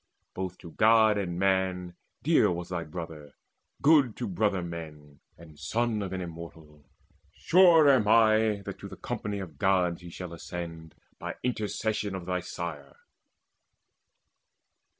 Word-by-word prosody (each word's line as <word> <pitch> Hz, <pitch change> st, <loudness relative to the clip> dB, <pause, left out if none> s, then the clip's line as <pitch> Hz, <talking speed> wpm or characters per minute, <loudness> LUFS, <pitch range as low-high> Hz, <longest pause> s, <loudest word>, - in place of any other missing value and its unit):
Both 95 Hz, -1 st, -5 dB
to 85 Hz, -, -12 dB
God 110 Hz, +2 st, +4 dB
and 90 Hz, -3 st, -3 dB
man 95 Hz, -1 st, 0 dB, 0.3 s
Dear -, -, +4 dB
was 85 Hz, 0 st, -4 dB
thy 85 Hz, -2 st, -3 dB
brother, 75 Hz, -3 st, -8 dB, 0.5 s
good 140 Hz, -6 st, +5 dB
to -, -, -3 dB
brother 95 Hz, -1 st, 0 dB
men, 75 Hz, -4 st, -9 dB, 0.2 s
And 80 Hz, -3 st, -15 dB
son 115 Hz, -2 st, -1 dB
of 95 Hz, -, -4 dB
an 95 Hz, -1 st, -3 dB
Immortal. 80 Hz, -3 st, -10 dB, 0.5 s
Sure 170 Hz, -, +5 dB
am 130 Hz, -7 st, +4 dB
I 110 Hz, -2 st, +4 dB
That -, -, -7 dB
to -, -, -8 dB
the -, -, -10 dB
company 105 Hz, -1 st, -4 dB
of 85 Hz, -8 st, -8 dB
Gods 90 Hz, -3 st, +2 dB
shall 90 Hz, +1 st, -7 dB
he -, -, -10 dB
Ascend, 80 Hz, -2 st, -7 dB, 0.2 s
by -, -, -5 dB
intercession 110 Hz, -3 st, -2 dB
of 90 Hz, -2 st, -6 dB
thy 90 Hz, 0 st, -1 dB
sire." 85 Hz, -5 st, -7 dB
90 Hz, 140 wpm, -28 LUFS, 85-105 Hz, 0.5 s, good